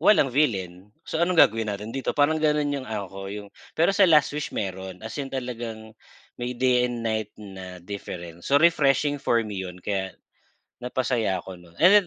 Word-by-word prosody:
walang 145 -11 +5
villain. 95 - 0 0.2
So, 160 - -3
"Anong 180 +1 +2
gagawin 110 +1 +2
natin 105 +2 -4
dito?" 135 - -2
Parang 150 +2 +3
gano'n 150 -1 +2
yung 135 -2 -3
ano 105 -4 -4
ko 95 0 -7
yung 100 0 -7 0.3
pero 165 +4 +4
sa 200 -1 +5
"Last 150 -3 +5
Wish" 150 0 -4
meron 95 0 -4
as 110 +6 -6
in 140 - -2
talagang 120 -4 -5 0.5
may 120 +1 -3
day 125 0 +3
and 120 -1 -4
night 110 -2 -2
na 95 -3 -10
difference, 85 -3 -7
so 140 - +4
refreshing 145 -3 +3
for 120 -4 +2
me 100 -3 -5
'yon. 90 0 -9
Kaya 95 -2 -2 0.6
napasaya 120 -6 -1
ako 95 -2 -9
nun, 85 -1 -18
and 195 +1 +7
115 Hz, 185 wpm, -25 LUFS, 95-140 Hz, 0.6 s, and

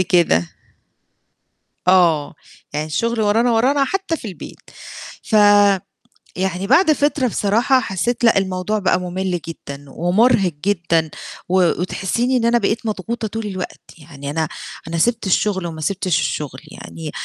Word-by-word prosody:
كده. 170 - +2 1.4
آه، 170 -5 +3 0.4
يعني 150 +1 -2
الشغل 230 +9 -1
ورانا، 220 +3 +2
ورانا 270 +5 +3
حتى 385 +1 -2
في 225 - -8
البيت. 185 - -10 0.6
فيعني 205 -2 +3 0.7
بعد 310 - +5
فترة 290 -2 +1
بصراحة 230 +6 +2
حسيت 225 +3 -2
لأ 230 -3 +5
الموضوع 190 +2 -1
بقى 190 -2 +1
مُمِلّ 180 0 -3
جدًا، 140 -3 -8
ومُرهِق 190 - +2
جدًا 165 -5 +1 0.4
و 185 +1 +2 0.2
وتحسيني 235 +8 -1
إن 240 - 0
أنا 235 +1 +4
بقيت 225 +2 -1
مضغوطة 220 +2 -3
طول 225 +1 -5
الوقت، 185 -3 -6 0.2
يعني 145 -2 -8
أنا 160 +1 -1 0.4
أنا 165 0 -3
سِبت 230 +4 +1
الشغل 190 -1 +1
وما 160 -2 -6
سِبتش 180 0 0
الشغل 135 -3 -3
يعني، 160 -2 -8
195 Hz, 130 wpm, -19 LUFS, 170-230 Hz, 1.4 s, بعد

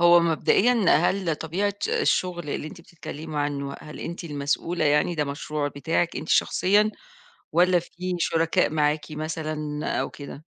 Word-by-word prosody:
هو 175 0 +7
مبدئيًا، 195 +7 +3
هل 175 0 +1
طبيعة 195 +7 -1
الشغل، 175 -4 0
اللي 150 - -3
أنتِ 165 +3 -10
بتتكلمي 155 -2 -8
عنه، 140 -1 -2
هل 150 - -9
أنتِ 170 +1 -6
المسؤولة 155 +2 -1
يعني 150 +4 +3
ده 150 -2 0
مشروع 145 +1 -3
بتاعِك 160 +4 -1
أنتِ 155 - -6
شخصيًا، 205 +3 +3 0.6
والّا 180 +1 +4
في 180 +1 -5
شركاء 165 -1 +2
معاكِ 150 0 +1
مثلًا 155 -1 -4
أو - - -2
كده؟ 145 +1 -10
160 Hz, 140 wpm, -25 LUFS, 150-175 Hz, 0.6 s, هو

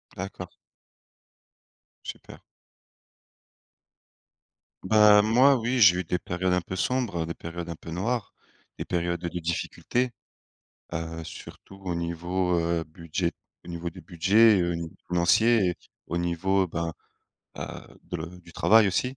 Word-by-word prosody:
D'accord. 90 -1 -6 1.5
Super! - - -9 2.4
Ben, 105 +1 +7
moi 125 +6 +5
oui, 120 +2 -1
j'ai 90 -4 +7
eu 90 - -1
des 90 +1 -1
périodes 90 +2 -1
un 90 - +2
peu 95 - -6
sombres, 100 -5 -1
des 85 - -4
périodes 85 +1 -7
un 85 - -4
peu 80 - -10
noires, 110 +5 -2 0.5
des - - -3
périodes 85 0 -1
de 85 - -3
difficultés. 85 +9 -1 0.8
Heu, 80 -1 -4
surtout 95 - -11
au 90 -2 -2
niveau, 85 +2 -1
heu, 85 -1 0
budget. 85 +2 -3 0.3
Au - - -12
niveau 85 0 -4
du 90 +2 -12
budget, 95 +5 +4
heu, 85 0 0
au - - -1
niveau 85 -1 -6
financier 95 +4 +4
et - - -7 0.3
au 85 - -2
niveau 90 +2 +1
ben, 85 0 -3 0.6
heu, - - -8
de 90 +1 -7
du 85 -1 -16
travail 110 -1 +5
aussi. 125 +8 -1
90 Hz, 140 wpm, -27 LUFS, 85-100 Hz, 2.4 s, Ben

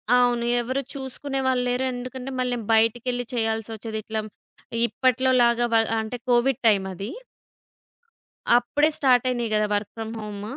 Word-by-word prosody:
అవును. 245 -1 +3 0.2
ఎవరు 260 +3 -2
చూసుకునేవాళ్ళు 265 -1 -2
లేరు. 250 +1 0
ఎందుకంటే, 255 +1 -6
మళ్ళీ 250 -1 0
నే - - -9
బయటికెళ్ళి 240 +2 +1
చేయాల్సొచ్చేది. 225 -1 -2
ఇట్ల‌మ్ 220 0 -4 0.6
ఇప్పట్లో‌లాగా 255 -2 +2
వ - - +4 0.3
అంటే 220 +3 -5
కోవిడ్ 245 +1 +3
టైమది. 195 0 +1 1.5
అప్పుడే 290 +5 +2
స్టార్టయినియి 250 -3 +2
గదా! 215 0 +2
Work 205 0 -1
from 225 0 -5
home. 205 -1 -7
240 Hz, 120 wpm, -24 LUFS, 220-255 Hz, 1.5 s, వ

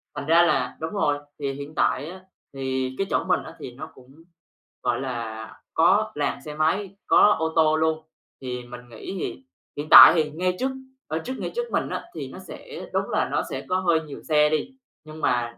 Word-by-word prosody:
Thành 140 - -5
ra 165 +2 +6
là 130 -7 0
đúng 160 - -3
rồi, 150 -8 +1 0.2
thì 140 -1 -2
hiện 145 +2 -9
tại 140 - +1
á, 185 0 -11 0.3
thì 130 -1 -3
cái 195 - -1
chỗ - - +1
mình 180 0 +1
á - - -11
thì 125 - -7
nó 155 +4 -8
cũng, 135 +5 -18 0.6
gọi 120 0 0
là, 115 -4 -5 0.2
có - - +3
làn - - -2
xe 150 -1 -7
máy, 185 +6 0
có 210 - +6
ô 160 0 -1
tô 155 -1 +4
luôn, 160 0 0 0.4
thì 125 -1 -5
mình 120 0 -10
nghĩ 115 - -8
thì 270 - -5 0.3
hiện 150 +1 -5
tại - - +11
thì 155 -2 +1
ngay 180 +4 -1
trước 265 +1 0 0.4
ở 160 +1 -2
trước 250 +11 -5
ngay - - -4
trước 480 0 -3
mình - - 0
á - - -4
thì - - -6
nó - - -10
sẽ 475 -2 -9
đúng - - -1
là - - 0
nó - - 0
sẽ - - -5
có 185 0 +1
hơi 170 -3 +2
nhiều 150 -3 -10
xe 150 -1 +3
đi, 245 - -2 0.3
nhưng 155 0 -10
mà 120 -1 0
155 Hz, 215 wpm, -24 LUFS, 130-170 Hz, 0.6 s, tại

